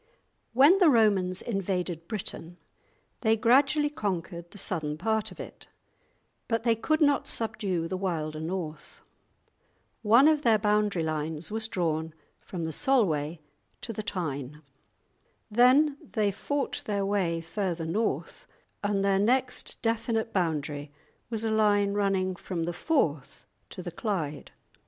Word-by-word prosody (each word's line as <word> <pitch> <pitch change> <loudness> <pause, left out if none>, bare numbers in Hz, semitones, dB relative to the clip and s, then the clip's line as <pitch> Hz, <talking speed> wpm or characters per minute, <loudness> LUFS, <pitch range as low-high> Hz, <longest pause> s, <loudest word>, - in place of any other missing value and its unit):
When 285 +10 +6
the 355 -5 +6
Romans 200 -7 +3
invaded 180 -5 -2
Britain 180 -5 -6 0.6
they 225 -1 +2
gradually 275 +6 +3
conquered 175 - -4
the 205 - -13
southern 155 -6 -3
part 220 +4 0
of - - -13
it, - - -9 0.8
but 230 -1 0
they 230 -1 +3
could 310 +8 0
not 290 -2 +3
subdue 195 -7 -2
the 185 - -3
wilder 160 -5 -2
north; 160 -2 -5 1.0
one 235 +6 +6
of 310 -2 +4
their 230 -6 +4
boundary 210 -4 +1
lines 155 +1 -3
was 220 0 -2
drawn 160 -5 -2 0.2
from 170 -3 -5
the 160 - -3
Solway 165 - +1 0.4
to 230 - -4
the 215 - -4
Tyne; 150 -7 -4 0.9
then 265 +6 +5
they 210 -3 -1
fought 280 +8 -3
their 200 -2 0
way 190 -5 0
further 170 0 -3
north 210 +8 -2 0.4
and 200 -1 +1
their 195 -1 +3
next 250 +4 0
definite 225 0 0
boundary 150 -5 -1 0.4
was 225 -1 -3
a 220 - 0
line 205 -2 +3
running 195 -2 +1
from 175 -1 -4
the 175 +1 -2
Forth 165 - -1 0.2
to 180 - -8
the 175 - -5
Clyde. 165 -7 -3
200 Hz, 135 wpm, -28 LUFS, 165-225 Hz, 1.0 s, When